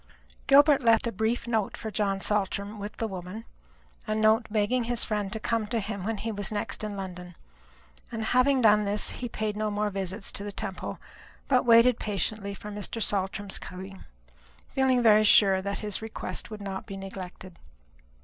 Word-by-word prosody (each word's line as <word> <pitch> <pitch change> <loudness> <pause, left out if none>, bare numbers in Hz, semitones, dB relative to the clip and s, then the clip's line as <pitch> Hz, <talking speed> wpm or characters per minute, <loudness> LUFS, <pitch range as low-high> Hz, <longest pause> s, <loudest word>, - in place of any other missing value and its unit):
Gilbert 285 +1 +6
left 230 0 +4
a 235 - -1
brief 220 +4 -1
note 220 -4 -1
for 220 - -6
John 195 -1 0
Saltram 205 +1 -1
with 205 +1 -6
the 225 - -1
woman 190 +3 -7 0.6
a 215 - 0
note 220 +1 +3
begging 220 +3 +1
his 240 0 +1
friend 210 -2 -2
to 220 - -3
come 225 -1 -1
to 230 +1 -1
him 200 -2 -4
when 225 0 -1
he 225 +2 -3
was 205 -1 -2
next 210 +1 -3
in 210 -1 -4
London; 180 -2 -7 0.8
and 225 -1 -3
having 255 +3 +3
done 210 -1 +5
this, 205 +1 +1
he 245 - -5
paid 215 -1 -3
no 215 0 -1
more 210 0 -1
visits 195 +1 -3
to 200 - -5
the 205 - -4
Temple, 200 -2 -5 0.5
but 260 -2 +3
waited 230 +1 +6
patiently 200 0 -2
for 210 +1 -8
Mr. 205 +2 -5
Saltram's 200 -1 -1
coming, 190 +1 -9 0.7
feeling 260 -2 +2
very 215 -1 +6
sure 195 -2 +6
that 200 +1 -3
his 210 +1 -2
request 220 +1 -5
would 215 -2 -8
not 190 -1 -5
be 195 - -6
neglected. 190 -2 -9
210 Hz, 180 wpm, -27 LUFS, 195-225 Hz, 0.8 s, Gilbert